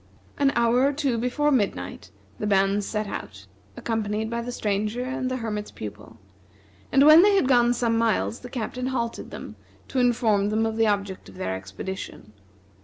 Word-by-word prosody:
An 280 -1 +4
hour 235 +1 +3
or 280 +2 +3
two 275 -5 0
before 295 +5 +1
midnight 220 -8 -1 0.3
the 210 - -2
band 195 0 +2
set 215 +1 -2
out, 95 - -7 0.3
accompanied 220 -1 -2
by 235 0 -2
the 245 +1 -5
Stranger 215 +1 -1
and 255 0 -3
the 255 - -2
Hermit's 210 -3 -4
Pupil; 105 +2 -9 0.7
and 275 +2 +5
when 310 +2 +9
they 405 +1 +5
had 385 - +3
gone 240 -2 +4
some 230 -2 +1
miles 230 +1 0
the 245 - -10
Captain 250 +1 -4
halted 235 -3 -3
them - - -9 0.3
to 265 - -1
inform 225 -5 +2
them 220 +1 +1
of 225 0 -2
the 225 0 +3
object 200 - -2
of 95 - -15
the - - -5
expedition. 95 - -6
225 Hz, 180 wpm, -25 LUFS, 205-250 Hz, 0.7 s, when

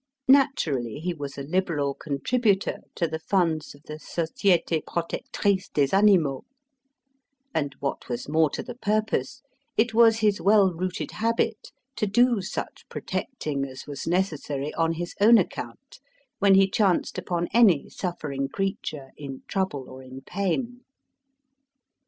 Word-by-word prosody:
Naturally, 170 - +3
he 175 +4 -3
was 145 -3 -7
a 140 - -4
liberal 150 -3 0
contributor 195 - 0 0.2
to 170 - 0
the 160 0 -4
funds 165 -4 0
of 145 - -20
the 155 - -8
Société 170 0 0
protectrice 185 +3 -1
des 140 +3 +2
animaux; 185 -10 +4 1.1
and, 145 -3 -1
what 140 -1 -4
was 120 - -4
more 155 +1 +3
to - - -5
the - - -7
purpose, 215 +3 -1 0.3
it 225 +1 +2
was 225 -1 +6
his 210 -2 +1
well 200 -2 +5
rooted 185 +3 -3
habit 225 0 -1 0.3
to 210 - 0
do 240 +1 +3
such 190 - -6
protecting 150 - -3
as 130 -1 -7
was 145 +1 -6
necessary, 150 -5 -1
on 165 0 +1
his 175 +1 -5
own 230 +3 +8
account, 190 - -4 0.4
when 195 -1 +5
he 195 0 +6
chanced 195 -2 +1
upon 175 -1 -2
any 205 -11 +5
suffering 145 -7 -4
creature 155 -7 -4
in 135 -2 -8
trouble 185 -9 -2
or 130 0 -10
in 130 0 -10
pain. 230 - -2
175 Hz, 140 wpm, -26 LUFS, 145-205 Hz, 1.1 s, own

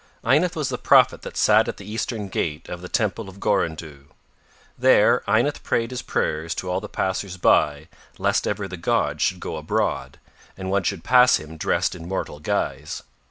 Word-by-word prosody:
Ynath 155 +9 +2
was 150 -4 -1
the - - -3
prophet - - +4
that - - -8
sat - - +4
at - - -4
the 100 - -11
Eastern 105 0 -3
gate 80 -5 -3
of 90 - -6
the 90 - -8
Temple 105 -2 -1
of 95 +1 -13
Gorandhu. 75 -6 -2 0.7
There - - +4
Ynath 120 +8 +1
prayed 115 +1 -1
his 125 - -4
prayers 80 +2 -2
to 90 - -4
all 90 - 0
the - - -8
passers 95 0 -2
by 75 -3 +2 0.3
lest - - +1
ever 100 - -2
the 95 -1 -7
gods 85 - 0
should 95 - +1
go 80 - -5
abroad, 75 0 -2 0.4
and 95 0 -4
one 100 0 +2
should 95 -1 -3
pass 125 0 +6
him 80 +1 -6
dressed 80 - 0
in 85 -1 -9
mortal 90 -5 -4
guise. 75 0 -3
95 Hz, 185 wpm, -23 LUFS, 80-110 Hz, 0.7 s, pass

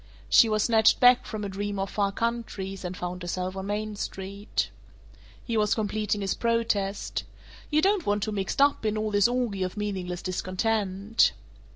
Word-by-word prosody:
She 230 - +7
was 215 -1 +2
snatched 220 -2 +4
back 250 0 +6
from 215 -2 -5
a - - -2
dream 200 +1 -3
of 195 0 -2
far 200 -1 +1
countries, 200 -4 -3
and 180 0 -5
found 180 +1 -5
herself 180 +1 -3
on 190 0 -5
Main 210 +1 -2
Street. 200 +1 -3 0.7
He 230 - -2
was 215 0 +2
completing 210 -1 -1
his 195 -1 0
protest, 225 -4 -1 0.5
"You 305 +1 +2
don't 395 -2 +2
want 205 0 +1
to 215 - -2
be 210 - -4
mixed 195 +8 +1
up 285 -4 +2
in 215 0 0
all 215 0 -1
this 205 0 +4
orgy 240 -5 -1
of 185 +3 -2
meaningless 185 -4 -3
discontent?" 195 +3 +1
205 Hz, 180 wpm, -27 LUFS, 195-225 Hz, 0.7 s, She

